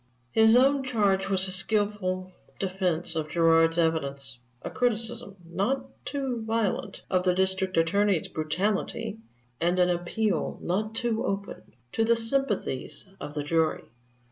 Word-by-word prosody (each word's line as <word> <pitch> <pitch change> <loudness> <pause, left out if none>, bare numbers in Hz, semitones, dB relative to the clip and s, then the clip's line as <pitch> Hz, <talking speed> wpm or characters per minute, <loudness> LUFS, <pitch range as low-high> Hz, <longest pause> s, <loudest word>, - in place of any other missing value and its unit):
His 220 +1 +6
own 270 +2 +4
charge 200 -6 +1
was 190 -1 +1
a - - -3
skillful 190 -2 0 0.3
defense 180 -3 -1
of 155 -1 -2
Gerard's 165 0 +4
evidence, 140 -6 0 0.2
a - - -5
criticism, 235 -3 -1
not 220 +10 -1 0.2
too 270 -5 -2
violent, 220 -2 -1
of 185 -1 +2
the 180 -1 +2
District 190 0 0
Attorney's 185 +2 +2
brutality, 200 +6 -2 0.4
and 175 +2 +1
an 180 0 +4
appeal, 175 +1 -1
not 215 +5 -1
too 230 -1 0
open, 200 -8 -4 0.2
to 225 - +1
the 230 +1 +4
sympathies 225 - -1
of 145 - -7
the 145 - -1
jury. 160 +1 +1
190 Hz, 135 wpm, -27 LUFS, 170-220 Hz, 0.4 s, His